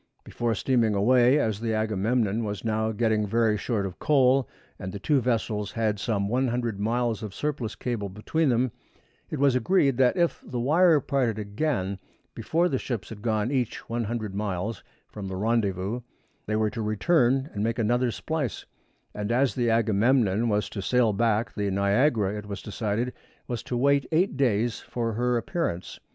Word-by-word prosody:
Before 115 -1 -2
steaming 115 -2 +1
away, 125 +6 +4
as 110 -8 0
the 115 -1 -1
Agamemnon 110 +1 0
was 105 -1 -4
now 110 0 0
getting 110 -1 +1
very 110 0 +2
short 105 -1 -1
of 95 -2 -7
coal, 135 -2 +3 0.3
and 95 - -5
the 100 - -6
two 140 +6 +1
vessels 110 -4 -1
had 110 -3 0
some 100 -2 -1
100 120 -2 -1
miles 115 +1 0
of 105 -3 -7
surplus 140 -7 -3
cable 115 -5 -3
between 135 +11 0
them, 125 0 +2 0.6
it 155 - -3
was 140 -1 +4
agreed 140 -2 +2
that 130 +6 +3
if 170 -1 +1
the 125 - -5
wire 160 +5 +4
parted 130 -7 0
again 100 -2 -2 0.3
before 165 +10 +1
the 135 -7 -1
ships 115 -7 -4
had 110 -2 -9
gone 110 +1 0
each 125 -5 -2
100 115 -3 -3
miles 100 +1 -3 0.2
from 100 -2 -7
the 95 - -5
rendezvous 105 +1 0 0.5
they 110 - 0
were 110 -1 +1
to 115 - -4
return 130 - +2
and 100 - -2
make 115 0 -1
another 120 +2 +1
splice; 145 0 -3 0.5
and 105 +1 -3
as 125 -1 +2
the 120 +1 0
Agamemnon 115 0 +2
was 105 -1 +1
to 100 - -6
sail 120 +1 +2
back, 110 +2 +1
the 100 -2 -1
Niagara, 100 +2 +2
it 105 -1 -7
was 100 0 -6
decided, 110 +3 -2 0.3
was 120 -2 -3
to 125 - -4
wait 140 +2 +2
eight 170 +1 +2
days 120 -4 +1
for 115 -2 -3
her 120 +2 +1
appearance. 120 - -3
115 Hz, 170 wpm, -26 LUFS, 105-125 Hz, 0.6 s, away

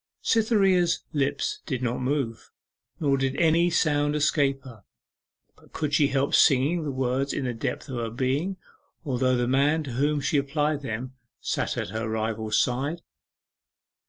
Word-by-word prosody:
Cytherea's 195 -6 +2
lips 140 -1 -1
did 130 -2 -2
not 120 0 -1
move, 130 -4 -2 0.5
nor 140 -3 +2
did 135 0 0
any 170 +1 +3
sound 145 -3 +1
escape 140 -3 +1
her; 115 -6 -13 0.7
but - - -23
could 150 -2 -3
she 145 -1 +4
help 140 +1 0
singing 145 +4 +4
the 150 - -3
words 130 +1 -1
in 135 - -2
the 125 - -1
depths 115 - -4
of 130 -3 -5
her 115 -1 -2
being, 135 +11 -1 0.5
although 130 -2 +1
the 120 0 0
man 145 +5 +2
to 140 - -6
whom 145 +4 +1
she 145 +2 0
applied 145 +1 -1
them 125 0 -5 0.3
sat - - -2
at - - -3
her 110 0 -3
rival's 110 -1 -1
side? 140 +7 0
140 Hz, 160 wpm, -26 LUFS, 125-150 Hz, 0.7 s, she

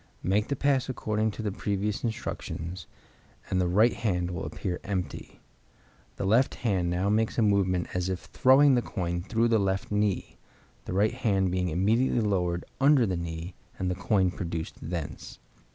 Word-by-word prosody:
Make 100 +3 +1
the 140 - -1
pass 135 -1 +1
according 110 -3 -1
to 110 - -4
the 105 - -1
previous 100 +1 -2
instructions, 90 -7 -4 0.6
and 95 -1 +2
the 90 - +1
right 105 +7 +4
hand 90 -5 -1
will 85 - -4
appear 90 -2 -4
empty. 90 -7 -5 0.7
The - - -3
left 115 +7 +3
hand 95 -7 0
now 90 +3 0
makes 110 +1 +1
a 115 - +4
movement 95 -4 +2
as 90 0 -1
if 90 -3 -3
throwing 135 +6 +5
the 125 - +3
coin 85 -6 -3
through 115 +5 +1
the 115 -1 +3
left 95 0 -1
knee, 105 -2 -1 0.5
the - - -4
right 105 +4 +2
hand 100 -7 +1
being 90 -1 0
immediately 110 +10 +2
lowered 90 -5 0
under 140 -2 +5
the 95 -3 -1
knee, 85 +1 -5 0.2
and 90 -1 -1
the - - +1
coin 95 0 +1
produced 85 -3 -5
thence. 80 -2 -6
95 Hz, 170 wpm, -28 LUFS, 90-110 Hz, 0.7 s, throwing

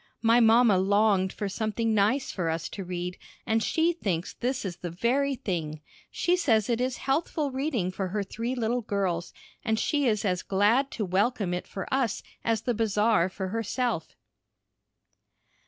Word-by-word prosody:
My 230 +1 +5
mamma 225 -3 +5
longed 200 -1 +3
for 205 - -4
something 220 +2 -1
nice 220 +7 +2
for 175 -4 -2
us 160 0 -2
to 195 - -6
read, 180 0 -4 0.3
and 225 0 +1
she 325 +9 +2
thinks 190 - -2
this 250 -1 -2
is 175 -3 -4
the 175 - -5
very 260 +10 +1
thing. 160 -9 -3 0.3
She 350 - +1
says 240 - +2
it 235 +1 0
is 255 -1 -1
healthful 290 +1 -1
reading 260 - -1
for 190 0 -3
her 200 +3 -2
three 230 +5 -4
little 240 0 0
girls, 190 -5 -2 0.3
and 220 -1 +1
she 285 +5 +1
is 215 -2 +1
as 180 -3 0
glad 215 +8 +2
to 215 - -2
welcome 195 +1 0
it 180 - -4
for 195 - -6
us 260 -6 0 0.2
as 225 -2 +1
the 245 - 0
Bazar 210 -3 +2
for 190 0 -5
herself. 225 -3 -2
220 Hz, 170 wpm, -27 LUFS, 190-245 Hz, 0.3 s, My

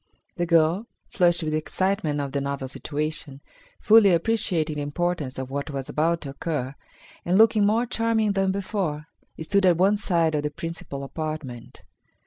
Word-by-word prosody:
The 175 -1 -1
girl, 170 +6 +3 0.2
flushed 175 -3 +2
with 155 -1 -2
excitement 160 0 -1
of 140 -1 -3
the 140 0 -1
novel 140 -1 -3
situation, 150 0 -4 0.4
fully 215 -2 +6
appreciating 170 -5 0
the - - -2
importance 145 -2 -2
of 130 0 -5
what 140 +2 -3
was 135 -2 -5
about 165 +2 0
to 140 - -6
occur, 140 -2 -3 0.5
and 180 +2 +2
looking 215 -1 +5
more 225 +3 +2
charming 225 -2 +1
than 195 -1 +1
before, 190 -6 -3 0.3
stood 195 +5 +1
at 175 -2 +4
one 195 +4 +3
side 170 -5 +1
of 150 - +1
the 150 - -2
principal 150 -3 -6
apartment. 155 -5 -6
165 Hz, 160 wpm, -25 LUFS, 145-195 Hz, 0.5 s, fully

